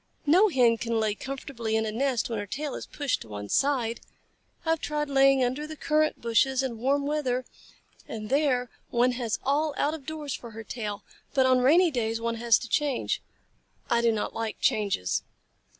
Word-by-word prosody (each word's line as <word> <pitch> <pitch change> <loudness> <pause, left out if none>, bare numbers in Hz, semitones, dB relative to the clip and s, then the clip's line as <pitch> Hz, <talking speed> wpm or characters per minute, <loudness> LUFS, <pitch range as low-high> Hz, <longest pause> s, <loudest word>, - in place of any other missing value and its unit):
No 360 +9 +6
Hen 245 -7 +4
can 230 -1 -1
lay 215 -1 +1
comfortably 235 -2 -4
in 220 0 +1
a 215 - -2
nest 250 +1 0
when 225 -3 -3
her 205 - -5
tail 285 +5 -4
is - - -6
pushed 285 -2 -2
to - - -9
one 105 -1 -7
side. 250 -5 +1 0.7
I 325 - +2
have 325 - 0
tried 295 -1 -2
laying 270 -1 +5
under 260 +5 -1
the 310 - -7
currant 310 0 +1
bushes 255 +3 +2
in 235 -4 -3
warm 280 +3 +1
weather, 260 -4 -1 0.6
and 215 -1 -6
there 265 -4 +2 0.2
one 245 +1 +3
has 240 -3 -2
all 290 +2 +1
out 295 - +1
of 295 -4 -8
doors 305 -3 -4
for 235 - -7
her 225 - -6
tail, 210 -2 -5 0.3
but 265 -1 +4
on 255 0 +4
rainy 325 +7 +5
days 225 -3 -1
one 230 0 -2
has 230 -1 +4
to 245 - -7
change. 285 0 0 0.7
I 235 - +4
do 235 -1 +4
not 215 -2 -2
like 225 -1 -4
changes." 200 - +1
255 Hz, 195 wpm, -27 LUFS, 230-285 Hz, 0.7 s, No